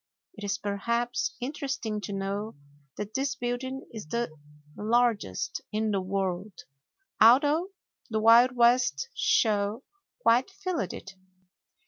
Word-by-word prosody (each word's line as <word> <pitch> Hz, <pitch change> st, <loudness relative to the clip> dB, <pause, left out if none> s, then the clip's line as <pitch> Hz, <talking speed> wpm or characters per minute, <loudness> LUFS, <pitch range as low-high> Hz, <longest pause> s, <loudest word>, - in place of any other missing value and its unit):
It 210 Hz, -, -11 dB
is, 200 Hz, 0 st, -1 dB
perhaps, 235 Hz, +4 st, -1 dB
interesting 260 Hz, -5 st, -3 dB
to 205 Hz, -, -6 dB
know 200 Hz, +2 st, -3 dB, 0.4 s
that 210 Hz, +1 st, -5 dB
this 270 Hz, 0 st, -1 dB
building 260 Hz, +2 st, -4 dB
is 215 Hz, -7 st, -7 dB
the 235 Hz, -3 st, -2 dB, 0.4 s
largest 220 Hz, -, 0 dB
in 215 Hz, 0 st, 0 dB
the 195 Hz, -2 st, 0 dB
world, 190 Hz, 0 st, -3 dB, 0.6 s
although 290 Hz, -, +6 dB, 0.4 s
the 220 Hz, -1 st, 0 dB
Wild 235 Hz, +3 st, +6 dB
West 235 Hz, -, +3 dB
Show 210 Hz, +2 st, +1 dB, 0.4 s
quite 245 Hz, +9 st, +4 dB
filled 365 Hz, -, -3 dB
it. 195 Hz, -, -9 dB
225 Hz, 115 wpm, -28 LUFS, 200-245 Hz, 0.6 s, although